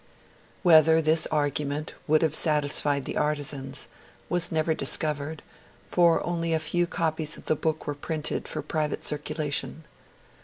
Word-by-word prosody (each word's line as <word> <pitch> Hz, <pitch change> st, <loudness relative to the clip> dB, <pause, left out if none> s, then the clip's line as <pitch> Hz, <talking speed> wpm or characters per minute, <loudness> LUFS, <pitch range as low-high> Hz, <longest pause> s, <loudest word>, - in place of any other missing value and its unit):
Whether 160 Hz, -2 st, +6 dB
this 160 Hz, 0 st, +2 dB
argument 145 Hz, 0 st, -1 dB
would 155 Hz, +1 st, +4 dB
have 155 Hz, -2 st, +1 dB
satisfied 145 Hz, -3 st, +1 dB
the -, -, -4 dB
artisans 145 Hz, -2 st, -2 dB, 0.4 s
was 175 Hz, -1 st, +1 dB
never 160 Hz, 0 st, +1 dB
discovered, 155 Hz, 0 st, -1 dB, 0.5 s
for 170 Hz, -2 st, +3 dB
only 170 Hz, -1 st, -1 dB
a -, -, +3 dB
very 155 Hz, -1 st, -1 dB
few 175 Hz, 0 st, +2 dB
copies 160 Hz, -2 st, -1 dB
of -, -, -14 dB
the 155 Hz, -, +2 dB
book 155 Hz, +1 st, -2 dB
were 145 Hz, -, -2 dB
printed 150 Hz, +1 st, -4 dB
for 155 Hz, -, -4 dB
private 155 Hz, 0 st, -2 dB
circulation. 150 Hz, +1 st, -2 dB
155 Hz, 145 wpm, -26 LUFS, 150-160 Hz, 0.5 s, Whether